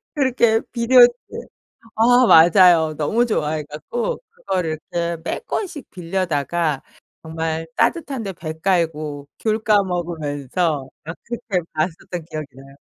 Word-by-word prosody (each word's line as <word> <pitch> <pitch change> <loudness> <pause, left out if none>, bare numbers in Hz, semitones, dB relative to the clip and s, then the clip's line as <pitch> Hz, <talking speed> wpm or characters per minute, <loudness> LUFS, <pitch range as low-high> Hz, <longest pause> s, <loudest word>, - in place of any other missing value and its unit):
그렇게 245 -5 +2
비디오집 245 +1 +6 0.8
아 245 +2 +5
맞아요. 165 -2 +6
너무 215 +11 +1
좋아해 155 -9 -1
갖고 155 - -4
그거를 185 - -3
이렇게 170 -1 -1
몇 475 - -4
권씩 330 - -4
빌려다가 170 -4 -2 0.4
정말 160 0 -3
따뜻한 280 -7 0
데 195 -2 -5
배 160 -2 -6
깔고 155 -5 -1
귤 220 0 0
까 210 -2 +4
먹으면서 160 -4 -2 0.2
막 165 +2 -7
그렇게 230 -6 -3
봤었던 165 +1 -3
기억이 155 -1 -5
나요. 135 +1 -14
175 Hz, 270 characters per minute, -21 LUFS, 155-225 Hz, 0.8 s, 비디오집